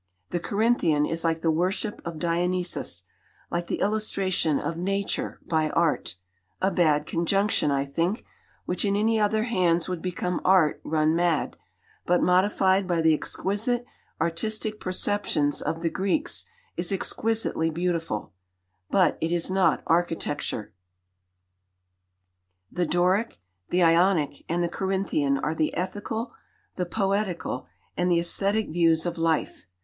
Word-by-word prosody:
The 175 - 0
Corinthian 200 -7 +2
is 165 +1 -2
like 165 -1 0
the 165 - +2
worship 185 +6 -1
of 170 -1 -5
Dionysus, 175 - -1 0.5
like 170 0 -2
the - - -3
illustration 195 -7 +1
of 165 - -3
Nature 195 +3 -2
by 155 -2 +1
Art 160 - 0 0.4
a 190 - +1
bad 155 -5 +2
conjunction, 195 +2 +1
I 140 -1 +1
think, 165 - -1 0.4
which 180 - -2
in 200 -1 +1
any 220 +2 +2
other 215 +1 +2
hands 175 -8 +1
would 180 -3 -3
become 180 -1 -2
Art 185 -5 +4
run 155 0 +1
mad, 170 -2 +1 0.5
but 180 0 +4
modified 190 +1 +3
by 175 -2 +1
the 160 -1 +5
exquisite 220 +10 -1 0.3
artistic 215 +6 -1
perceptions 185 -6 0
of 165 +1 -3
the 165 - +2
Greeks 285 - 0 0.3
is 175 +2 -1
exquisitely 215 -3 0
beautiful, 165 - -2 0.6
but 185 -4 +3
it 160 - 0
is 175 +1 +2
not 185 -4 +2
architecture. 165 -10 -1 2.0
The 175 -2 -1
Doric, 180 +7 +1 0.3
the 180 0 +3
Ionic, 165 -3 +3
and 175 +1 +1
the - - +1
Corinthian 190 -7 0
are 150 +3 -1
the 155 -1 0
ethical, 205 +6 -3 0.4
the 180 -1 -2
poetical, 195 - -1 0.3
and 180 0 +1
the 170 - +4
aesthetic 200 +5 0
views 165 0 +2
of 170 -1 -3
life. 165 - -1
175 Hz, 135 wpm, -26 LUFS, 165-195 Hz, 2.0 s, the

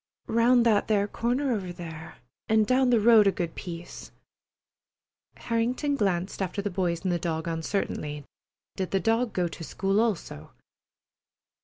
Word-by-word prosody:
"Round 235 +1 +4
that 215 -3 +3
there 205 -2 +2
corner 250 +6 -1
over 190 -5 -3
there, 165 -2 -9 0.3
and 220 -1 +4
down 255 +2 +3
the 240 -2 +4
road 220 -1 +6
a - - +5
good 170 -3 -3
piece." 175 -1 -8 1.3
Harrington 245 +5 -1
glanced 195 -5 -1
after 190 +1 -3
the 200 0 -2
boys 175 -2 -1
and 185 - 0
the 175 - 0
dog 160 -1 -3
uncertainly. 160 -3 -3 0.5
Did 190 -1 -3
the 195 - +1
dog 225 +3 +1
go 180 -2 0
to 165 - -9
school 195 +5 0
also? 195 - -2
195 Hz, 150 wpm, -27 LUFS, 175-230 Hz, 1.3 s, road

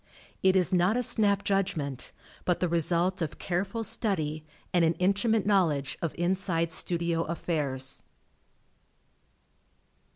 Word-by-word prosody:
It 190 0 +4
is 185 0 +3
not 180 +5 +3
a 250 - 0
snap 205 -3 +2
judgment, 180 - -1 0.3
but 180 - 0
the 180 - +1
result 170 +2 +1
of 160 -2 -3
careful 195 +5 -2
study 160 -8 +1 0.3
and 175 -1 +4
an 165 0 +2
intimate 200 +5 +1
knowledge 165 -9 +2
of 165 - -3
inside 175 -2 0
studio 170 0 -1
affairs. 145 -6 -3
175 Hz, 120 wpm, -28 LUFS, 165-195 Hz, 0.3 s, It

